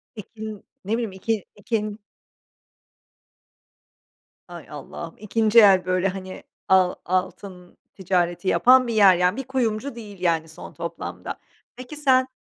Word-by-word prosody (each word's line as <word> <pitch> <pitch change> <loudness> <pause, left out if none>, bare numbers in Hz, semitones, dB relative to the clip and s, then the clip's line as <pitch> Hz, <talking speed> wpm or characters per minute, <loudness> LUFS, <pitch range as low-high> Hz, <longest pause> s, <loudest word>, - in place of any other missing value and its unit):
Peki 215 +1 -11
n 215 -3 -7 0.2
ne 205 - -5
bileyim 230 -2 -1
iki 200 +2 -3
ikin 210 0 -3 2.5
Hay 175 -3 -10
Allah'ım 150 +3 -9
2. 215 +2 +3
el 195 -4 +6
böyle, 185 +1 +1
hani, 185 -1 -7 0.2
al 185 -1 +4
altın 185 0 -4 0.2
ticareti 180 -1 -1
yapan 255 +5 +5
bir 235 - -2
yer. 200 -4 +6
Yani 180 +4 +1
bir 270 - -3
kuyumcu 255 0 -2
değil, 210 -4 -10
yani, 165 -3 +1
son 160 - -11
toplamda. - - -6 0.4
Peki 255 +4 -9
sen 260 -3 +3
200 Hz, 130 wpm, -23 LUFS, 185-225 Hz, 2.5 s, el